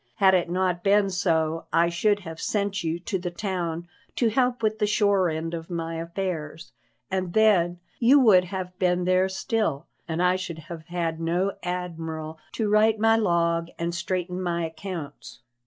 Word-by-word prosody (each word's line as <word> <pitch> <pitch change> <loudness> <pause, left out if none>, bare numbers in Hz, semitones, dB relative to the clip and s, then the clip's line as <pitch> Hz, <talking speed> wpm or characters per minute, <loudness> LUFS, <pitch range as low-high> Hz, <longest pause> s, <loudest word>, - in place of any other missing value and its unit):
Had 190 -2 +5
it 175 -2 +2
not 180 -1 0
been 200 0 +3
so 165 -4 0
I 170 +1 +3
should 205 +4 +1
have 165 -3 -8
sent 200 -2 -1
you 165 0 -1
to 190 +1 -2
the 175 0 -3
town 175 -3 -3 0.3
to 235 - +2
help 250 0 +1
with 215 0 +1
the 210 - +2
shore 200 -3 +3
end 160 +1 -3
of 165 -1 -6
my 165 -1 -3
affairs, 165 -2 -4 0.4
and 185 -2 -2
then 180 -6 +3 0.2
you 255 +4 +6
would 200 -8 +6
have 180 -1 -6
been 180 -1 +1
there 185 +1 +3
still 190 -5 -1 0.2
and 160 -1 -3
I 180 +1 +3
should 180 -3 -5
have 160 0 -9
had 170 -2 -2
no 175 +4 0
admiral 160 -3 -5
to 220 - -1
write 215 +1 +4
my 225 +1 +4
log 170 -5 +1
and 170 0 -2
straighten 180 +1 -2
my 170 -2 -1
accounts." 160 -2 -7
180 Hz, 170 wpm, -25 LUFS, 165-200 Hz, 0.4 s, you